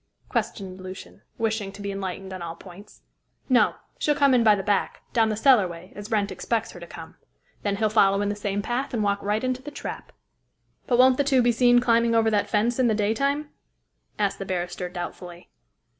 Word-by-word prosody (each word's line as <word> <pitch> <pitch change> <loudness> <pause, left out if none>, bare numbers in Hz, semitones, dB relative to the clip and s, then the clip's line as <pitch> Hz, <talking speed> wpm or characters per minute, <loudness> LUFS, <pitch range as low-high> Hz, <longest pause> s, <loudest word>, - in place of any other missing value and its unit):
questioned 190 -2 -3
Lucian, 185 0 -10 0.2
wishing 220 -3 -1
to 200 - -13
be 200 0 -4
enlightened 190 -1 -5
on 185 - -7
all 165 -1 -5
points. 190 +4 -14 0.5
"No. 250 -1 +4 0.2
She'll 295 - +2
come 280 -2 +4
in 245 -2 +4
by 215 -2 +6
the 195 - -4
back, 205 -1 -1
down 225 -2 +3
the 215 - -1
cellarway, 195 -8 +2
as 205 +1 -8
Wrent 205 -3 0
expects 225 -1 -2
her 175 - -11
to 170 - -10
come. - - -11 0.4
Then 200 -1 -1
he'll 215 +2 +1
follow 195 -2 +4
in 205 - 0
the 205 - -2
same 205 0 -2
path 250 +4 -2
and 215 - 0
walk 200 0 0
right 210 +3 -1
into 255 0 -1
the 285 - -7
trap." 290 - -7 0.8
"But 245 - +2
won't 255 0 +6
the 285 - +3
two 265 -3 +3
be 240 - +4
seen 245 +1 +4
climbing 230 -1 +3
over 225 -1 +3
that 205 -1 +1
fence 230 +4 +1
in 255 - +4
the 220 - +2
daytime?" 275 +8 0 0.7
asked 200 -2 0
the 195 - -4
barrister 180 -1 -3
doubtfully. 175 0 -8
210 Hz, 205 wpm, -25 LUFS, 195-240 Hz, 0.8 s, by